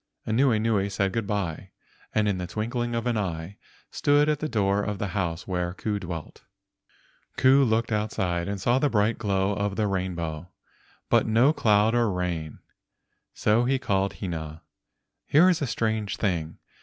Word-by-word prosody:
Anuenue 110 -4 +2
said 100 -1 -1
good 115 -3 -2
by, 95 -3 -3 0.4
and 105 -1 +1
in 100 -3 0
the 90 - -4
twinkling 120 +4 -2
of 115 0 -2
an 120 -3 0
eye 85 -1 -4 0.3
stood 145 +1 +3
at 150 -1 +1
the 155 - -3
door 100 -3 +1
of 105 0 -3
the 100 0 -3
house 90 -3 -3
where 90 -1 -2
Ku 105 0 -2
dwelt. 85 -4 -7 0.9
Ku 135 +2 +5
looked 115 -1 +1
outside 95 -5 -1
and 100 0 -3
saw 120 +7 +2
the 145 - +2
bright 105 -1 +1
glow 100 -2 0
of 100 0 -2
the 110 - 0
rainbow, 90 -4 -3 0.6
but - - +3
no 120 +7 +4
cloud 105 -4 +3
or 120 -2 +2
rain, 85 -4 -3 0.8
so 110 +3 +2
he 135 +2 +2
called 100 -6 0
Hina. 80 -4 -6 0.6
"Here 160 +6 +5
is 180 -4 +2
a 140 - 0
strange 110 -3 -1
thing. 85 -6 -2
105 Hz, 165 wpm, -26 LUFS, 90-115 Hz, 0.9 s, Ku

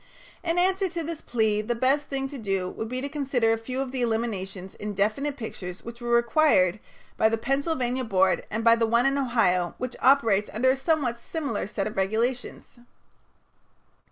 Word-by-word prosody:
In 335 0 0
answer 380 +1 +2
to 340 -1 -4
this 320 0 -5
plea 220 -3 +1
the 235 +3 -2
best 270 +5 +2
thing 270 -1 -3
to 280 -1 -7
do 195 -4 -1
would 220 +4 -5
be 255 +1 -3
to 280 - -2
consider 275 -6 +1
a - - 0
few 255 +3 -5
of 265 -2 -4
the 260 -1 -3
eliminations 200 -5 -2
in 210 0 -6
definite 270 +9 0
pictures 185 -6 -7
which 235 +1 -9
were 240 - -4
required 235 - +3 0.4
by 220 - +4
the 225 - 0
Pennsylvania 260 0 -1
board 190 -4 +2
and 225 +1 -2
by 230 0 +6
the 230 -1 +1
one 235 +2 +3
in 275 0 +3
Ohio 225 -10 +1
which 255 0 -4
operates 225 -7 +4
under 260 +4 +3
a - - +1
somewhat 270 -4 0
similar 275 - -3
set 200 -1 -3
of 215 - -5
regulations. 230 +6 -2
235 Hz, 185 wpm, -26 LUFS, 215-275 Hz, 0.4 s, by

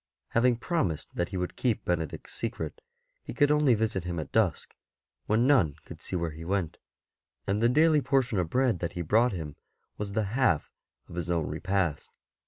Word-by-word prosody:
Having 120 +1 +3
prom 160 - 0
ised 80 - -6
that 85 - -1
he 95 - -4
would 90 0 -3
keep 115 -4 0
Benedict's 85 -3 -3
secret, 115 0 -4 0.4
he - - -8
could 145 -1 +4
only 150 -5 +4
visit 105 -4 -1
him 85 -1 -3
at 75 - -6
dusk, 105 -8 +1 0.5
when 110 +3 +3
none 105 - +4
could - - -11
see - - -5
where 85 -2 -1
he 80 +2 -9
went, 90 -2 -2 0.7
and 100 +2 0
the 115 - +4
daily 155 +3 +4
portion 130 -7 +1
of 85 -3 -1
bread 125 -3 +2
that 85 -1 -3
he 85 - -3
brought 115 +9 +3
him 80 -6 -6 0.4
was 100 -1 -4
the 110 +1 +1
half 120 - +2 0.4
of - - -12
his 85 -1 -3
own 85 -3 +1
repast. 95 -6 -1
100 Hz, 190 wpm, -28 LUFS, 85-120 Hz, 0.7 s, could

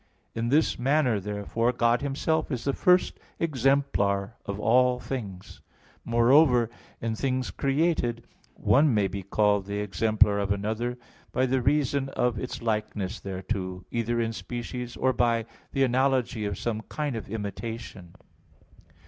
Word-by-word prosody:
In 115 +1 -2
this 150 0 +2
manner 130 -4 +2
therefore 105 +4 -1
God 120 0 +2
Himself 155 +3 0
is 125 -3 -2
the 140 - 0
first 180 +4 +3 0.2
exemplar 125 - +1
of 100 0 -3
all 125 +3 +3
things. 105 -9 -7 0.4
Moreover, 120 0 +4 0.3
in 115 -1 -2
things 130 +1 -1
created 135 -5 0 0.3
one 140 -3 +3
may 100 -2 +3
be 100 +1 -5
called 100 0 +1
the 100 0 -3
exemplar 105 0 +2
of 100 -1 -1
another 110 +5 -2 0.3
by 130 - +2
the 130 0 +1
reason 140 0 +1
of 125 -3 0
its 125 - -5
likeness 105 -2 -2
thereto, 95 -1 -4
either 120 0 -1
in 115 -1 -1
species, 120 +1 -6
or 130 0 +2
by 115 -2 +1 0.3
the 135 - +2
analogy 130 -3 +1
of 100 -3 -3
some 110 -2 -2
kind 150 -4 -2
of 110 - -6
imitation. 105 -3 -6
120 Hz, 140 wpm, -27 LUFS, 105-130 Hz, 0.4 s, Moreover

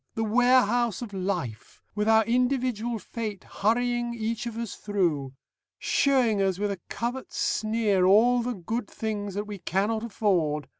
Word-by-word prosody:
The 225 - -1
Warehouse 240 0 +3
of 215 -4 -8
Life, 180 - -4
with 210 +1 0
our 220 0 +5
Individual 245 -1 0
Fate 215 -2 -6
hurrying 240 +2 0
each 230 +1 -3
of 230 -1 -6
us 230 -3 -4
through. 165 -10 -1 0.4
Showing 275 - +2
us 190 -2 +1
with 205 +1 -1
a 190 -3 -6
covert 245 +3 -4
sneer 215 -3 +1
all 240 +5 +5
the 245 0 -3
good 210 +5 -4
things 205 -3 -4
that 205 +1 -2
we 205 -2 -7
cannot 210 +6 -1
afford. 170 - 0
220 Hz, 150 wpm, -27 LUFS, 200-240 Hz, 0.4 s, our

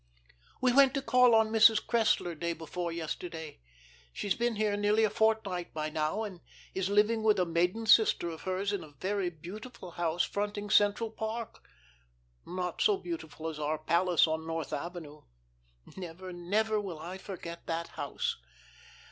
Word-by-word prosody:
"'We 255 -1 +3
went 270 0 +6
to 275 - 0
call 250 -3 +5
on 220 -1 +3
Mrs. 220 -1 +6
Cressler 220 -6 +2
day 170 +2 -2
before 170 +2 -4
yesterday. 165 - -5 0.5
She's 195 - -1
been 240 -1 0
here 210 -1 +1
nearly 205 +2 +2
a 215 - +2
fortnight 210 -6 0
by 155 0 -2
now, 155 +7 -1
and 190 -5 -7 0.3
is 190 0 -1
living 210 +2 +3
with 215 -1 +4
a 180 - +2
maiden 180 +6 0
sister 220 -5 +5
of 165 -1 -6
hers 190 +2 -1
in 195 -4 -2
a 150 -2 -14
very 195 -1 -1
beautiful 180 +5 -10
house 170 0 0
fronting 205 0 -3
Central 210 +2 +3
Park 220 +1 -5 0.8
(not 180 -1 -3
so 415 -2 +4
beautiful 330 - -6
as 155 -2 -5
our 155 +1 -1
palace 170 +2 +3
on 160 0 -3
North 165 -2 -3
Avenue. 155 -1 -6 0.7
Never, 180 0 -7
never 210 +5 0
will 185 -5 -6
I 175 +5 -7
forget 170 -3 -8
that 165 0 -2
house). - - -3
185 Hz, 160 wpm, -31 LUFS, 170-220 Hz, 0.8 s, went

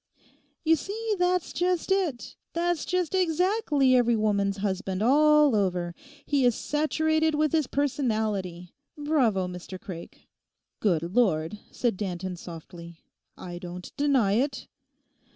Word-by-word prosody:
'You 325 +1 +5
see, 430 +7 -3
that's 360 -1 +1
just 360 +1 0
it! 355 -11 -1 0.2
That's 345 -1 0
just 365 -2 -1
exactly 355 - +2
every 240 -1 +4
woman's 200 -2 +1
husband 195 0 -2
all 300 +1 +5
over; 180 -4 0 0.3
he 285 -3 +1
is 245 -2 +4
saturated 315 +1 +1
with 305 -1 +1
his 310 -4 +1
personality. 215 -11 -1 0.2
Bravo, 255 -11 +1
Mr 180 +1 -8
Craik!' 175 -2 -10 0.5
'Good 175 -7 +1
Lord,' 185 -5 +1
said 235 -6 -1
Danton 185 -2 -4
softly. 170 0 -10 0.4
'I 175 -1 -7
don't 180 0 -9
deny 275 -8 +2
it! 265 +5 -1
245 Hz, 120 wpm, -27 LUFS, 185-310 Hz, 0.5 s, You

